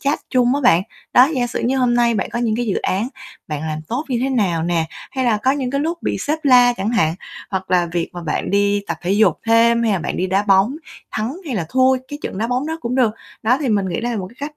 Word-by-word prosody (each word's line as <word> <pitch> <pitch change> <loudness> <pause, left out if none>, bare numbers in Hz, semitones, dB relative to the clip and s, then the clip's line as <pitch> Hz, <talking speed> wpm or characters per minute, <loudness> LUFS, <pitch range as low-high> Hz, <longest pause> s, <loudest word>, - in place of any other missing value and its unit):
chat 285 +2 0
chung 250 -1 +3
á 285 - 0
bạn. 185 -10 +4 0.3
Đó, 255 +3 +7
giả 245 -2 0
sử 240 - -4
như 265 +3 +1
hôm 245 -1 +2
nay 235 -1 +3
bạn - - -2
có 235 - -3
những 230 -2 0
cái 240 - -2
dự 200 - 0
án 200 +6 -1 0.4
bạn 150 -2 -3
làm 155 0 -3
tốt 255 +6 -2
như 250 -3 0
thế 265 - 0
nào 195 -11 0
nè, 170 -1 0 0.3
hay 260 -1 -2
là 235 -3 +3
có 235 +5 +1
những 265 -3 -1
cái 275 - -1
lúc 335 +3 -2
bị - - -1
sếp 305 +2 -1
la 250 -3 +6
chẳng 210 -2 -3
hạn, 165 -9 +2 0.4
hoặc 190 -1 -4
là 180 -1 +3
việc 170 -1 -1
mà 175 - -7
bạn 150 -3 -2
đi 200 0 +2
tập 170 - -3
thể 180 +2 0
dục 200 -5 +3
thêm 230 +1 +4
hay 225 -3 +2
là 190 - +1
bạn - - -4
đi 185 - 0
đá 190 +2 +1
bóng, 200 +6 +3 0.3
thắng 225 +7 -3
hay 270 - -3
là 175 -7 -2
thua 260 +4 +3
cái 290 - -6
trận - - -5
đá 225 - 0
bóng 250 +4 -1
đó 320 +1 -4
cũng 240 -4 -3
được. 245 -5 +2 0.3
Đó 245 +4 +3
thì 280 - -1
mình 200 -4 +1
nghĩ 175 - -2
đây 240 +1 -2
là 225 - -2
một 185 - -4
cái 235 - -19
cách 300 - -27
230 Hz, 290 wpm, -19 LUFS, 190-255 Hz, 0.4 s, Đó